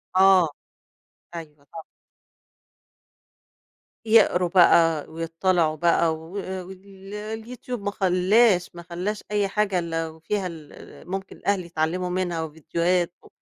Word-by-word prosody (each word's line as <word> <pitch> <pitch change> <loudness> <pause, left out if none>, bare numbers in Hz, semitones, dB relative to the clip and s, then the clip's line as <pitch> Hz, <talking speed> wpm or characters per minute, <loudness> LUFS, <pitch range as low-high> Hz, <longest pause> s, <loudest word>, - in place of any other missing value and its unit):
آه، 190 -3 +6 0.9
أيوه، 150 -4 -10
طبعًا. 160 +3 -11 2.2
يقرُوا 210 -5 +4
بقى 165 -3 +4
ويضطّلِعوا 165 0 0
بقى 165 0 +2
و 160 +5 -9
ال 190 +1 -8
اليوتيوب 220 +3 -6
ما 205 0 -2
خلّاش، 185 0 +2
ما 170 - -8
خلّاش 180 +5 -4
أي 205 -1 +1
حاجة 200 -2 0
إلّا 165 -1 -3
وفيها 175 +5 -3
ال 160 0 -12
ممكن 195 +1 -5
الأهل 200 -3 -1
يتعلّموا 170 +2 -2
منها 175 -3 -2
وڤيديوهات 170 +3 0
و - - -16
180 Hz, 110 wpm, -24 LUFS, 165-195 Hz, 2.2 s, آه